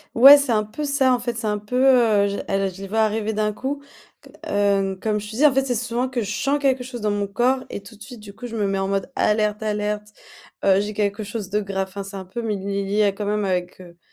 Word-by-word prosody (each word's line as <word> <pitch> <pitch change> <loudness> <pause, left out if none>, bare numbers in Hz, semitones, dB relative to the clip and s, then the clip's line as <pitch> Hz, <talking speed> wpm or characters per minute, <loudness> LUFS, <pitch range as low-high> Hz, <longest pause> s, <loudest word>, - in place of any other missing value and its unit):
Ouais, 275 +5 +10
c'est 280 -3 -1
un 215 -2 +2
peu 220 +8 -6
ça 280 -3 +2
en 250 - +1
fait, 240 -1 -3
c'est 225 - -3
un 210 0 0
peu, 210 +5 -4
heu, 230 -6 +4
j 200 0 -3
elle 195 0 +1
je 195 - -12
les 195 - -7
vois 220 +2 0
arriver 220 0 +1
d'un 210 0 -1
coup 280 +5 -4 0.4
c - - -15 0.2
heu, 200 -1 +1
comme 210 -1 -1
je 210 +1 -8
te 220 - -7
dis 300 - +4
en 285 - +6
fait, 270 - +2
c'est 260 -2 -1
souvent 245 +2 -2
que 250 -2 -2
je 205 - -4
sens 275 +7 0
quelque 265 -2 +1
chose 245 -1 -7
dans 210 -1 0
mon 205 0 -1
corps 250 +6 +1
et 200 - -6
tout 210 +3 -14
de 210 - -23
suite 245 -3 -11
du 205 -1 -11
coup, 225 - -9
je 230 -1 -5
me 205 -2 0
mets 195 0 -1
en 195 0 -1
mode 195 -1 -1
alerte, 210 0 +1
alerte, 210 0 -2 0.6
heu, 195 0 +5
j'ai 210 +1 -4
quelque 205 +1 -1
chose 205 -1 -6
de 210 +1 0
grave, 195 -1 -3
enfin, 200 +1 -7
c'est 195 0 -8
un 190 - -7
peu 190 +6 -6
mé 215 -3 -2
lié 200 +1 -3
lié 200 +1 +1
quand 210 - -4
même 210 0 0
avec, 180 -1 -2
heu, 175 -2 -14
210 Hz, 285 wpm, -22 LUFS, 200-240 Hz, 0.6 s, Ouais